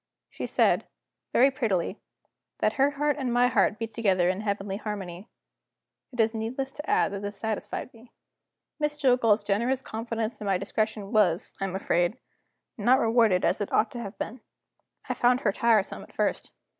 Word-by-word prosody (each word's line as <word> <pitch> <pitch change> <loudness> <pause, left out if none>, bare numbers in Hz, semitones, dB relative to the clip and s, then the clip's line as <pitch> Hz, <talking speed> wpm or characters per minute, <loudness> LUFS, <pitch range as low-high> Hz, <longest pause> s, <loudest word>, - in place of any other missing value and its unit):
She - - -5
said, - - +2 0.4
very 270 +3 +5
prettily, 215 -8 -1 0.6
that - - +1
her 275 +1 +3
heart 295 0 +1
and 260 -3 -1
my 245 +1 +4
heart 215 -2 +2
beat 225 -1 -5
together 190 -6 +2
in 185 +2 -1
heavenly 200 -2 -2
harmony. 200 -3 -6 0.8
It 245 - -12
is 225 0 +3
needless 240 +5 -3
to 295 +2 -8
add - - +3
that 200 -1 -5
this 205 0 -5
satisfied 220 +3 -4
me. 235 +1 -17 0.7
Miss 300 -1 -1
Jillgall's 245 -7 +3
generous 235 +6 0
confidence 225 0 -4
in 205 - -4
my 195 -2 +2
discretion 210 +1 -2
was, 200 -5 +2
I - - +1
am 190 -1 -4
afraid, 175 +2 +1 0.6
not 245 +5 +5
rewarded 225 -6 +3
as - - +1
it 205 - -3
ought 215 - +2
to 240 - -6
have 200 -2 -7
been. 235 +2 -5 0.7
I - - 0
found 245 +1 +3
her 210 - +2
tiresome 220 -1 +2
at - - -14
first. - - -1
220 Hz, 175 wpm, -27 LUFS, 200-245 Hz, 0.8 s, very